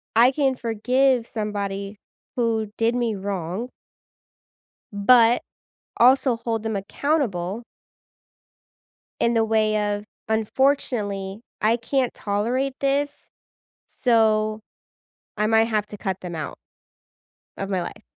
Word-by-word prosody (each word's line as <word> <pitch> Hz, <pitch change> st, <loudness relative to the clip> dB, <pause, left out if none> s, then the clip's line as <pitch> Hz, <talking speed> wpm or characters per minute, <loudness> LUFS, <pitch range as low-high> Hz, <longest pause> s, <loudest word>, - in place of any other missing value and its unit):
I 240 Hz, +3 st, +6 dB
can 270 Hz, -1 st, +1 dB
forgive 250 Hz, +2 st, +1 dB
somebody 200 Hz, -2 st, -4 dB, 0.4 s
who 225 Hz, -3 st, 0 dB
did 230 Hz, +1 st, +2 dB
me 235 Hz, -3 st, 0 dB
wrong 195 Hz, +3 st, -4 dB, 1.2 s
but 230 Hz, +3 st, +5 dB, 0.6 s
also 255 Hz, +1 st, +5 dB
hold 225 Hz, -2 st, -2 dB
them 220 Hz, -1 st, -2 dB
accountable 205 Hz, -, -1 dB, 1.6 s
in 235 Hz, -, +2 dB
the 225 Hz, -1 st, +3 dB
way 215 Hz, -1 st, +1 dB
of, 205 Hz, 0 st, -4 dB, 0.2 s
"Unfortunately, 220 Hz, -4 st, 0 dB, 0.2 s
I 225 Hz, +2 st, +3 dB
can't 255 Hz, +2 st, 0 dB
tolerate 240 Hz, +7 st, -1 dB
this, 280 Hz, +1 st, -1 dB, 0.6 s
so 215 Hz, -3 st, +2 dB, 0.8 s
I 210 Hz, -, +1 dB
might 225 Hz, 0 st, +4 dB
have 215 Hz, -2 st, 0 dB
to 210 Hz, -, -9 dB
cut 190 Hz, -2 st, -3 dB
them 175 Hz, -2 st, -6 dB
out 155 Hz, -, -5 dB, 1.0 s
of 195 Hz, -, -4 dB
my 185 Hz, -3 st, 0 dB
life." -, -, -7 dB
220 Hz, 110 wpm, -23 LUFS, 205-245 Hz, 1.6 s, I